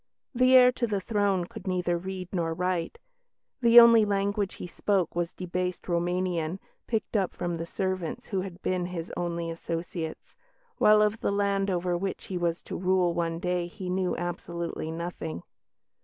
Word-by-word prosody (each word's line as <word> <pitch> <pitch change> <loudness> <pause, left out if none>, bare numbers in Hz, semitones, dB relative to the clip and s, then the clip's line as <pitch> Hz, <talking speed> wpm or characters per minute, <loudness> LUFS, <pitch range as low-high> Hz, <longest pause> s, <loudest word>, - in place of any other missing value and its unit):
The 255 +1 +5
heir 250 -1 +8
to 245 -1 -1
the 205 -2 0
throne 200 -3 +1
could 185 - -10
neither 180 -1 0
read 185 +1 -5
nor 165 -3 -1
write; 180 - -1 0.6
the 235 0 +9
only 230 -1 +8
language 200 -1 0
he - - -7
spoke 180 0 0
was 175 -1 -1
a - - -36
debased 180 0 -3
Roumanian, 175 -1 0 0.3
picked 220 -1 -2
up 195 -3 +1
from 175 -1 -2
the 165 0 -5
servants 185 -2 -3
who 190 -2 0
had 185 -2 -7
been 180 -1 0
his 175 -2 -6
only 170 -1 -2
associates, 165 0 -5 0.4
while 210 0 +6
of 210 +1 +1
the - - 0
land 200 -1 +1
over 180 -1 0
which 190 +2 -3
he 185 - -4
was 170 -1 -1
to - - -6
rule 180 -1 +2
one 165 -1 -1
day 180 0 -1
he 180 0 -6
knew 185 0 0
absolutely 170 -2 -4
nothing. 160 - -5
180 Hz, 170 wpm, -28 LUFS, 170-195 Hz, 0.6 s, the